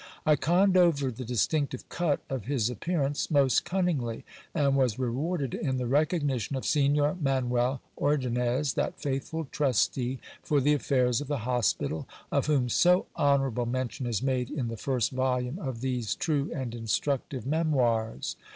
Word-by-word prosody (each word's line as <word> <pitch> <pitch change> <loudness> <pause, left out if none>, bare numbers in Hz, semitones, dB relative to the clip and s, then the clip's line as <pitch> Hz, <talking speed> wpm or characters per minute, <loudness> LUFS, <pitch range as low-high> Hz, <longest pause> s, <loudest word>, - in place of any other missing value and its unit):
I 155 - +5
conned 180 +7 +3
over 150 -7 +3
the 125 +2 -7
distinctive 130 +3 -1
cut 165 -4 0
of 130 -6 -4
his 125 -3 0
appearance 145 - -1
most 140 -4 +3
cunningly, 165 -12 -1 0.3
and 140 -3 +2
was 130 -6 +2
rewarded 135 +3 -2
in 130 -4 -1
the 125 - -2
recognition 145 -1 0
of 130 - -4
Signor 145 +2 +2
Manuel 130 -2 +1 0.2
Ordonnez, 130 -1 +1
that - - -2
faithful 145 +4 -3
trustee 130 -1 +1 0.2
for 150 - +1
the 145 +2 +3
affairs 130 -3 +1
of 145 - -6
the 135 -6 -3
hospital, 120 -10 0 0.2
of - - +1
>vhom 135 -5 +2
so 180 +7 +4
honourable 135 -4 +1
mention 130 +1 -3
is 115 -1 -1
made 130 -2 0
in 125 -6 -3
the 115 - -4
first 125 0 -1
volume 130 +3 -1
of 130 - -5
these 125 -4 -1
true 145 -3 0
and 130 -6 -4
instructive 125 +2 -2
memoirs. 130 -7 0
135 Hz, 150 wpm, -28 LUFS, 125-145 Hz, 0.3 s, I